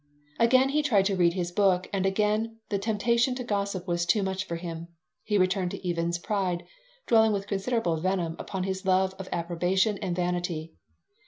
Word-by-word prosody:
Again 255 +3 +5
he 300 +2 +2
tried 215 -10 +3
to 195 0 +1
read 175 -2 +3
his 175 -1 -2
book 185 -1 +2
and 195 -1 +1
again 215 +3 0
the 200 - 0
temptation 235 +4 +1
to 250 - -4
gossip 200 -4 -2
was 170 -1 0
too 185 +4 +2
much 190 +1 -2
for 170 - -4
him. 165 -1 -6 0.4
He 210 -1 +1
returned 185 -1 +1
to 180 - -6
Even's 170 0 0
pride, 180 -2 -1 0.4
dwelling 220 -2 +4
with 200 -1 -2
considerable 200 -3 -1
venom 175 -1 -1
upon 190 -2 -4
his 190 0 -3
love 190 0 +2
of 190 - -7
approbation 180 +4 0
and 175 - -2
vanity. 175 -2 -2
190 Hz, 180 wpm, -27 LUFS, 175-210 Hz, 0.4 s, Again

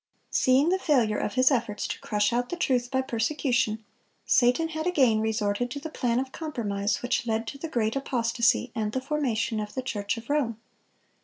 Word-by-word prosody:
Seeing 265 +5 +4
the 375 +1 +2
failure 245 - +2
of 200 - -3
his 255 +2 +5
efforts 230 -5 -1
to - - -4
crush 210 +2 0
out 245 +1 0
the - - -2
truth 250 -7 0
by 260 0 0
persecution, 235 -3 0 0.4
Satan 265 +5 +3
had 315 +1 -3
again 260 -11 +3
resorted 220 +1 0
to 285 - -5
the 315 +2 -7
plan 240 -5 0
of 260 0 -3
compromise 215 -11 -2
which 245 -1 0
led 225 0 0
to 275 - -9
the 325 - -5
great 225 -5 0
apostasy 235 -2 +1
and 215 -1 -2
the 260 - 0
formation 255 -6 -1
of 210 0 -5
the 260 - -2
Church 205 -3 -2
of 230 +1 -9
Rome. 280 -7 0
245 Hz, 190 wpm, -27 LUFS, 220-275 Hz, 0.4 s, his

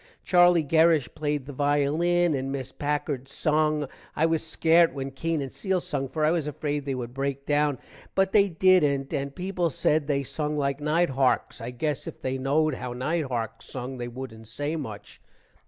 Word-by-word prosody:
Charlie 175 -2 +5
Gerish 160 -2 +3
played 150 -3 -2
the 145 - -8
violin 150 +5 +2
and 135 -1 -2
Miss 135 -2 -4
Packard 145 -2 -2
sung. 150 0 +1 0.3
i 155 - +3
was 165 -1 +1
scart 165 +1 +3
when 135 0 -4
Keene 160 +2 -2
and 135 - -7
Cele 190 -2 0
sung 145 -7 -3
for 155 +1 0
i 155 - +4
was 165 -3 0
afraid 145 0 -3
they 135 -2 -2
would 120 -1 -5
break 140 +1 -3
down, 145 -2 +2 0.4
but 195 0 +2
they 200 -1 +5
dident, 155 -6 +3
and 140 0 -3
people 180 -2 -1
said 150 +1 +1
they 140 -2 +1
sung 150 +2 -3
like 140 -1 0
night 155 +1 +2
harks. 130 -1 +1
i 115 - -4
gess 145 +4 -3
if - - -7
they 130 0 -2
knowed 150 +3 +2
how 125 -1 -5
night 150 +6 -1
harks 115 -4 -4
sung 130 0 -6
they 120 - -3
woodent 120 -3 -8
say 145 +7 -3
much. 110 -9 -7
145 Hz, 190 wpm, -26 LUFS, 135-160 Hz, 0.4 s, Charlie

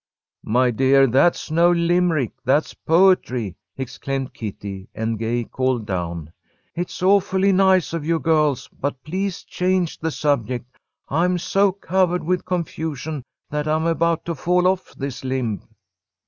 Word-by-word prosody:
"My 125 +3 +3
dear, 135 +3 +4
that's 135 +6 +2
no 170 +2 +4
Limerick, 170 -6 +2
that's 135 +4 +1
poetry!" 160 - +2 0.2
exclaimed 135 +1 -4
Kitty, 100 -3 -7
and 110 0 -2
Gay 120 +2 -1
called 130 -1 -1
down: 85 -5 -4 0.4
"It's 175 +1 -5
awfully 195 0 +3
nice 190 -3 +3
of 165 -3 -2
you, 165 +2 +1
girls, 155 -4 +1
but 135 -2 -5
please 185 +3 -3
change 180 -2 -1
the 160 - -1
subject. 125 -5 -1 0.3
I'm 175 +5 +2
so 195 +3 +2
covered 185 -1 0
with 180 +2 -1
confusion 160 -4 -3 0.3
that 150 +1 -2
I'm 155 +1 +1
about 165 0 +1
to 170 - -2
fall 180 +4 +1
off 185 0 0
this 135 -2 -5
limb." 125 -7 -2
155 Hz, 135 wpm, -22 LUFS, 125-180 Hz, 0.4 s, dear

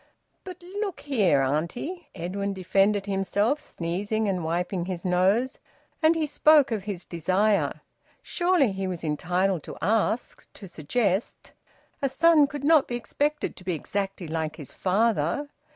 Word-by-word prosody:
"But 365 -2 -10
look 390 +1 -4
here, 200 - +2
auntie," 170 - -2
Edwin 195 +3 -3
defended 195 +2 +2
himself, 205 +7 0
sneezing 205 - -3
and 185 -3 -1
wiping 175 +2 -1
his 185 -1 -5
nose; 190 +8 +2 0.4
and 320 +1 +5
he 320 -1 0
spoke 300 -2 +4
of 210 -4 -2
his 195 -4 -5
desire. 190 +5 +1 0.4
Surely 350 - +2
he 190 0 -3
was 180 -3 -5
entitled 175 +4 0
to - - -9
ask, 225 +2 -1
to 195 - -10
suggest! 190 +5 -2 0.5
A 275 - +1
son 310 +1 +5
could 285 0 -7
not 305 -1 +5
be 240 - -3
expected 295 +5 -2
to 185 - -12
be 180 -2 -1
exactly 195 +2 -4
like 155 -1 -3
his 145 -5 -10
father. 205 - +1
200 Hz, 145 wpm, -26 LUFS, 180-275 Hz, 0.5 s, and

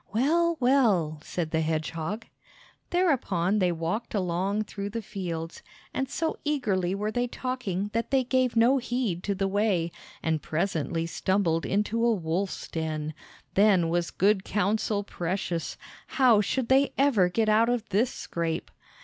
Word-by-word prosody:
"Well, 330 +9 +2
well!" 215 - +3
said 165 -1 -3
the 160 - +1
hedgehog. 160 - -2 0.6
Thereupon 215 - +1
they 180 -2 +3
walked 170 +8 -3
along 190 +3 0
through 200 -1 -5
the 230 +2 -4
fields, 170 -5 -5 0.3
and 265 -1 -2
so 320 +2 -2
eagerly 200 -11 0
were 210 +2 -2
they 245 +2 0
talking 235 -6 -3
that 230 +1 -1
they 265 -1 +3
gave 255 -1 +1
no 240 +4 +5
heed 240 -8 -2
to 200 - 0
the 195 0 0
way, 195 -4 +1 0.3
and 160 -1 0
presently 165 -1 -1
stumbled 170 -1 0
into 210 +3 0
a 235 -1 +4
wolf's 180 +2 -2
den. 155 -1 -3 0.4
Then 195 -4 +4
was 170 0 0
good 195 0 +2
counsel 210 +1 0
precious! 175 -2 -3 0.3
How 245 -6 +4
should 250 +3 -1
they 270 +1 +4
ever 240 -10 +4
get 220 +4 +1
out 220 +2 +4
of 245 -2 -1
this 215 +6 +2
scrape? 165 -1 -3
200 Hz, 150 wpm, -27 LUFS, 170-235 Hz, 0.6 s, no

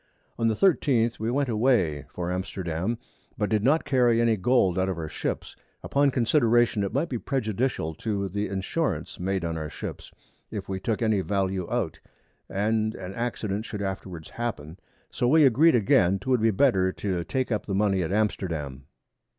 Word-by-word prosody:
On 115 - +2
the 110 - +2
13th 120 - +2
we 110 +1 -1
went 140 +3 +1
away 110 - +1
for 90 0 -3
Amsterdam, 90 +2 -2 0.4
but 105 -1 -1
did 105 -1 +2
not 150 +6 +3
carry 120 -3 +3
any 115 -1 +3
Gold 95 -3 +2
out 95 +1 +1
of 95 - -3
our 80 -2 -4
Ships, - - -4 0.3
upon 140 0 +2
Consideration 120 -4 +3
it 100 - -2
might 140 +8 0
be 125 -6 -3
prejudicial 115 - -1
to 100 +3 -2
the 100 +3 -2
Insurance 95 - -2
made 95 -1 -1
on 80 -1 -2
our 75 -1 -4
Ships, - - -7 0.4
if - - -6
we 95 -1 -3
took 110 +3 -1
any 110 -3 +2
Value 95 -2 -1
out, - - -1 0.5
and 110 +2 0
an 95 0 -7
Accident 110 -3 -2
should 105 -2 -5
afterwards 95 -4 -6
happen, 95 -8 -5 0.3
so 120 - 0
we 155 +3 +6
agreed 145 +5 +5
again, 95 -4 +3
'twould 125 +2 0
be 115 - +4
better 95 -4 +3
to 95 -4 -2
take 130 +6 -2
up 105 -4 -1
the 100 - -1
Money 100 -2 +2
at 85 - -2
Amsterdam. 80 -10 -2
105 Hz, 175 wpm, -26 LUFS, 95-120 Hz, 0.5 s, we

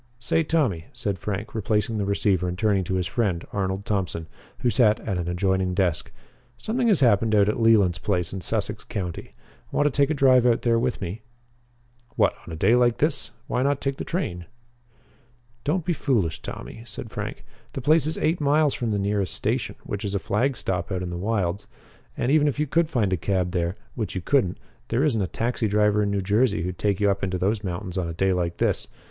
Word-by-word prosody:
"Say, 125 +7 +1
Tommy," 140 - 0
said 105 -6 -2
Frank, 105 +3 -4
replacing 110 0 0
the 100 - 0
receiver 100 -2 +1
and 90 0 -3
turning 100 -2 +2
to 95 - -2
his 90 -1 0
friend, 95 -4 -1
Arnold 95 0 -2
Thompson, 95 -5 -2 0.4
who 120 - +2
sat 110 -1 +4
at 95 -5 -2
an 85 - -3
adjoining 95 +1 0
desk, 90 -4 0 0.5
"something 240 +2 -1
has 200 -9 +4
happened 110 -3 +4
out 100 -1 +5
at 105 - 0
Leland's 105 -7 +4
place 90 -2 -1
in 95 - -4
Sussex 105 +1 -1
County. 90 -5 -5 0.4
Want 145 - +1
to 150 - +3
take 140 +1 +2
a 155 - +1
drive 130 -3 +5
out 115 -1 +2
there 115 -1 +3
with 125 +1 -1
me?" 95 +4 -5 0.9
"What? - - +3
On - - -7
a - - -4
day 95 +8 +3
like 120 -1 +3
this? 150 -1 0 0.2
Why 125 - -1
not 140 +1 +1
take 135 -1 -2
the - - -4
train?" 90 - -3 1.2
"Don't 160 +3 0
be 175 - +1
foolish, 115 - 0
Tommy," - - -8
said 120 - -8
Frank. - - -5 0.3
"The 135 - -4
place 155 +2 +4
is 160 - -1
eight 160 +1 0
miles 145 0 +3
from 120 - -2
the 105 - 0
nearest 100 -2 -1
station, - - -1
which 100 +1 -5
is 100 -1 -2
a - - +1
flag 120 +7 0
stop 90 -2 -2
out 90 -1 -1
in 90 - -4
the - - -4
wilds. 100 0 -1 0.5
And, 120 - 0
even 150 0 +4
if 145 0 -1
you 150 - +2
could 165 +3 +1
find 110 - +1
a - - +1
cab 90 +1 0
there 85 0 -1 0.2
which 110 -5 -4
you 95 - -2
couldn't 100 -4 +1 0.3
there 120 +4 +1
isn't 125 -9 +2
a 95 - 0
taxi 115 +5 -1
driver 105 0 +3
in 100 -1 0
Jersey 105 -2 +2
who'd 90 0 -4
take 100 -2 +1
you 100 -1 +3
up 100 0 -3
into 95 -1 0
those 100 +4 0
mountains 90 0 -4
on 90 - -2
a 85 - -5
day 95 +2 +2
like 85 -1 -1
this. - - 0
105 Hz, 215 wpm, -25 LUFS, 95-125 Hz, 1.2 s, out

